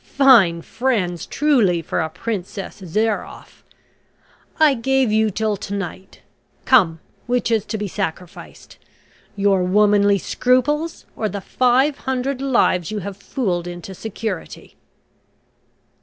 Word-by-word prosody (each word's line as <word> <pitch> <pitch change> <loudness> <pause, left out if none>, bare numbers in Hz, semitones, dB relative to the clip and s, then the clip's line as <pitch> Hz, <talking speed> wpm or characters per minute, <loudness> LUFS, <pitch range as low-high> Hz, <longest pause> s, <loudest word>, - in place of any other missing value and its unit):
"Fine 210 -12 +5
friends 205 -9 -2
truly 225 - +2
for - - -2
a 160 -1 -1
Princess 195 +1 -6
Zairoff. 215 +5 -3 1.0
I 310 -3 +6
gave 265 -1 +1
you 220 0 +2
till 215 +1 -1
to 200 - -5
night 190 0 -7 0.4
come, 180 -11 +4 0.3
which 245 -1 0
is 220 -3 +1
to 220 - -4
be 205 -1 -3
sacrificed 170 0 -7 0.6
your 195 -2 +2
womanly 205 +1 +3
scruples, 255 - 0
or 215 - -2
the 200 - -5
five 255 +7 +1
hundred 260 +1 -2
lives 235 - +1
you 215 - -4
have 200 -1 -5
fooled 185 -6 -3
into 175 +2 -8
security?" 210 -2 -6
210 Hz, 120 wpm, -20 LUFS, 185-250 Hz, 1.0 s, I